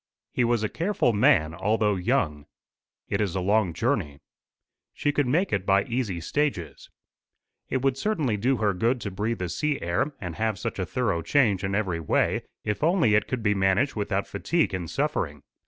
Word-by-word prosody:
He 125 Hz, -, +2 dB
was 120 Hz, -2 st, +1 dB
a -, -, +2 dB
careful 175 Hz, -, 0 dB
man, 105 Hz, -, +3 dB
although 105 Hz, +4 st, +1 dB
young. 90 Hz, -, -1 dB, 0.6 s
"It 100 Hz, -, -1 dB
is 95 Hz, -4 st, -1 dB
a -, -, 0 dB
long 100 Hz, 0 st, +2 dB
journey." 85 Hz, -, -1 dB, 0.8 s
"She 145 Hz, -, 0 dB
could 145 Hz, -2 st, 0 dB
make 170 Hz, +10 st, +1 dB
it 100 Hz, -2 st, +1 dB
by 100 Hz, +1 st, +3 dB
easy 115 Hz, -7 st, -2 dB
stages." 95 Hz, -, -2 dB, 0.8 s
"It 130 Hz, 0 st, -1 dB
would 135 Hz, -1 st, +1 dB
certainly 155 Hz, -, 0 dB
do 125 Hz, +6 st, +1 dB
her 105 Hz, -2 st, +1 dB
good 115 Hz, +7 st, +1 dB
to 100 Hz, -, -4 dB
breathe 105 Hz, +5 st, -2 dB
the 90 Hz, -, -3 dB
sea 150 Hz, -, -1 dB
air 85 Hz, -, -1 dB
and 90 Hz, -5 st, -6 dB
have 110 Hz, -2 st, 0 dB
such -, -, -4 dB
a 95 Hz, -, -2 dB
thorough 110 Hz, -7 st, 0 dB
change 105 Hz, -, +2 dB
in 95 Hz, 0 st, -1 dB
every 95 Hz, -5 st, -1 dB
way 80 Hz, -, +1 dB, 0.2 s
if 105 Hz, +6 st, -2 dB
only 165 Hz, -, +3 dB
it 105 Hz, -1 st, +3 dB
could 125 Hz, -3 st, -3 dB
be 105 Hz, -2 st, +3 dB
managed 100 Hz, +8 st, +2 dB
without 100 Hz, -2 st, -1 dB
fatigue 165 Hz, -, 0 dB
and 90 Hz, -3 st, -3 dB
suffering. 125 Hz, -, -2 dB
105 Hz, 190 wpm, -26 LUFS, 95-130 Hz, 0.8 s, man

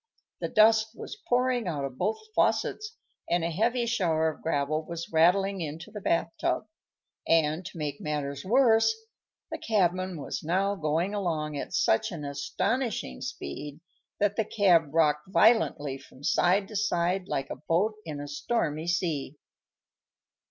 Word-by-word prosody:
The -, -, -2 dB
dust 220 Hz, +1 st, +4 dB
was 415 Hz, -, -8 dB
pouring 245 Hz, -3 st, +2 dB
out 145 Hz, -5 st, -2 dB
of 130 Hz, -2 st, -8 dB
both 210 Hz, +5 st, 0 dB, 0.2 s
faucets, 430 Hz, +2 st, 0 dB, 0.3 s
and 175 Hz, -1 st, +1 dB
a 170 Hz, -, -1 dB
heavy 235 Hz, +7 st, +1 dB
shower 165 Hz, -9 st, +1 dB
of 155 Hz, -, -9 dB
gravel 155 Hz, 0 st, 0 dB
was 170 Hz, +1 st, -6 dB
rattling 190 Hz, +4 st, +3 dB
into 160 Hz, +6 st, -6 dB
the 210 Hz, -1 st, -7 dB
bath 170 Hz, -2 st, +1 dB
tub; -, -, 0 dB, 0.6 s
and, 160 Hz, +1 st, +2 dB
to 185 Hz, -, -10 dB
make 145 Hz, -2 st, -4 dB
matters 140 Hz, -2 st, -3 dB
worse, 235 Hz, -, +4 dB, 0.6 s
the -, -, -4 dB
cabman 185 Hz, -4 st, 0 dB
was -, -, -4 dB
now 190 Hz, +5 st, +1 dB
going 165 Hz, +2 st, -1 dB
along 160 Hz, -7 st, -2 dB
at 140 Hz, -, -4 dB
such 110 Hz, -, +2 dB
an 150 Hz, -4 st, -6 dB
astonishing 215 Hz, -, -2 dB
speed 150 Hz, -, -6 dB, 0.4 s
that 205 Hz, 0 st, +1 dB
the 220 Hz, -, +2 dB
cab 175 Hz, -9 st, +3 dB
rocked 155 Hz, +1 st, +2 dB
violently 170 Hz, -, +3 dB
from 135 Hz, 0 st, -17 dB
side 190 Hz, +6 st, +2 dB
to 215 Hz, -, -9 dB
side, 185 Hz, -2 st, 0 dB
like 135 Hz, -6 st, -3 dB
a -, -, -3 dB
boat 190 Hz, +7 st, +2 dB
in 150 Hz, -3 st, -6 dB
a 145 Hz, -, -6 dB
stormy 155 Hz, 0 st, -2 dB
sea. 160 Hz, -5 st, -1 dB
175 Hz, 150 wpm, -28 LUFS, 150-210 Hz, 0.6 s, dust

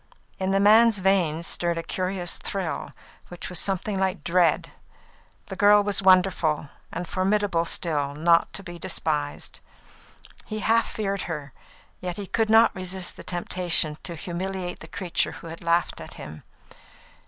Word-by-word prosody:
In 190 Hz, 0 st, -1 dB
the 195 Hz, 0 st, +2 dB
man's 220 Hz, +2 st, +6 dB
veins 180 Hz, -4 st, +2 dB
stirred 170 Hz, 0 st, 0 dB
a 165 Hz, -, -3 dB
curious 185 Hz, 0 st, -2 dB
thrill, 190 Hz, -5 st, -4 dB, 0.4 s
which 175 Hz, -, -7 dB
was 180 Hz, -3 st, 0 dB
something 195 Hz, +1 st, -1 dB
like 190 Hz, -5 st, -1 dB
dread. 175 Hz, 0 st, +2 dB, 0.7 s
The -, -, -7 dB
girl 205 Hz, 0 st, +6 dB
was 205 Hz, -1 st, 0 dB
wonderful, 180 Hz, -6 st, +3 dB, 0.2 s
and 180 Hz, -, -5 dB
formidable 190 Hz, -2 st, +1 dB
still, 145 Hz, -5 st, 0 dB
not 165 Hz, +2 st, +3 dB
to 195 Hz, -, -3 dB
be 175 Hz, -2 st, -9 dB
despised. 150 Hz, -3 st, -2 dB, 0.9 s
He 215 Hz, -, -4 dB
half 230 Hz, +2 st, +3 dB
feared 200 Hz, -2 st, -2 dB
her, 150 Hz, -4 st, -5 dB, 0.5 s
yet 180 Hz, -1 st, -4 dB
he 205 Hz, -, -4 dB
could 220 Hz, +3 st, 0 dB
not 225 Hz, +1 st, +6 dB
resist 185 Hz, 0 st, -2 dB
the -, -, -10 dB
temptation 175 Hz, -3 st, 0 dB
to 170 Hz, -, -4 dB
humiliate 180 Hz, +2 st, -4 dB
the -, -, -10 dB
creature 185 Hz, -4 st, -1 dB
who -, -, -11 dB
had 165 Hz, +1 st, -9 dB
laughed 170 Hz, +1 st, +1 dB
at -, -, -9 dB
him. 75 Hz, +1 st, -9 dB
180 Hz, 155 wpm, -25 LUFS, 170-195 Hz, 0.9 s, man's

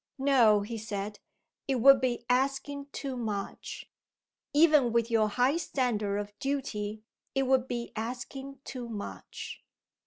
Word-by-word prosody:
"No!" 250 Hz, -7 st, +5 dB
he 225 Hz, +2 st, -5 dB
said. 205 Hz, -1 st, -4 dB, 0.5 s
"It 270 Hz, -, +1 dB
would 265 Hz, +2 st, +7 dB
be 245 Hz, -2 st, -1 dB
asking 275 Hz, +3 st, 0 dB
too 275 Hz, -2 st, -4 dB
much. 210 Hz, -5 st, -4 dB, 0.7 s
Even 295 Hz, -5 st, +5 dB
with 235 Hz, 0 st, +1 dB
your 220 Hz, -2 st, +3 dB
high 250 Hz, +8 st, +2 dB
standard 230 Hz, -10 st, 0 dB
of 205 Hz, 0 st, -4 dB
duty, 220 Hz, -7 st, -2 dB, 0.3 s
it 270 Hz, -, +3 dB
would 260 Hz, -1 st, +2 dB
be 240 Hz, -1 st, -4 dB
asking 260 Hz, +4 st, -5 dB
too 245 Hz, -3 st, -6 dB
much." 210 Hz, -3 st, -7 dB
245 Hz, 130 wpm, -30 LUFS, 215-270 Hz, 0.7 s, would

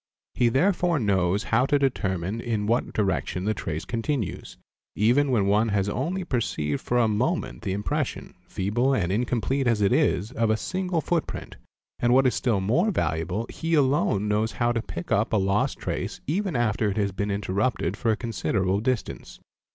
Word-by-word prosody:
He 120 Hz, -2 st, +3 dB
therefore 175 Hz, +5 st, +2 dB
knows 100 Hz, -4 st, +1 dB
how 120 Hz, +3 st, +2 dB
to 145 Hz, -, +3 dB
determine 105 Hz, -6 st, -1 dB
in 110 Hz, -4 st, -2 dB
what 115 Hz, +3 st, 0 dB
direction 95 Hz, -3 st, -1 dB
the 110 Hz, -, +1 dB
trace 80 Hz, -7 st, -4 dB
continues, 115 Hz, -, -3 dB, 0.4 s
even 125 Hz, +7 st, +3 dB
when 115 Hz, -6 st, +2 dB
one 105 Hz, +3 st, +3 dB
has 100 Hz, -1 st, +1 dB
only 165 Hz, -, -2 dB
perceived 90 Hz, -, -2 dB
for 120 Hz, -, 0 dB
a 120 Hz, -2 st, +4 dB
moment 120 Hz, +11 st, -1 dB
the 100 Hz, -4 st, -2 dB
impression, 130 Hz, +8 st, -3 dB
feeble 120 Hz, +8 st, 0 dB
and 90 Hz, -6 st, 0 dB
incomplete 125 Hz, +4 st, 0 dB
as 115 Hz, -3 st, +2 dB
it 100 Hz, -2 st, +3 dB
is, 100 Hz, +6 st, +1 dB
of 115 Hz, -3 st, 0 dB
a 110 Hz, -, +2 dB
single 185 Hz, +3 st, -2 dB
foot 170 Hz, +1 st, 0 dB
_ -, -, -33 dB
print, -, -, -7 dB, 0.4 s
and 120 Hz, +1 st, +3 dB
what 135 Hz, 0 st, +5 dB
is 130 Hz, -, +3 dB
still 110 Hz, -6 st, 0 dB
more 130 Hz, -, +2 dB
valuable 90 Hz, -, -1 dB
he 165 Hz, 0 st, -1 dB
alone 130 Hz, -8 st, +2 dB
knows 105 Hz, +2 st, 0 dB
how 120 Hz, 0 st, +1 dB
to 115 Hz, -1 st, -1 dB
pick 85 Hz, -5 st, -7 dB
up 105 Hz, +3 st, +1 dB
a -, -, +4 dB
lost 95 Hz, +1 st, +1 dB
_ -, -, -26 dB
trace -, -, -3 dB
even 185 Hz, +2 st, -1 dB
after 110 Hz, -3 st, +1 dB
it 100 Hz, -, -3 dB
has 100 Hz, -2 st, +1 dB
been 100 Hz, +2 st, -3 dB
interrupted 100 Hz, -1 st, -1 dB
for 115 Hz, -, -1 dB
a 110 Hz, -, +2 dB
considerable 100 Hz, -4 st, -1 dB
distance. 125 Hz, +1 st, -3 dB
110 Hz, 190 wpm, -25 LUFS, 100-130 Hz, 0.4 s, what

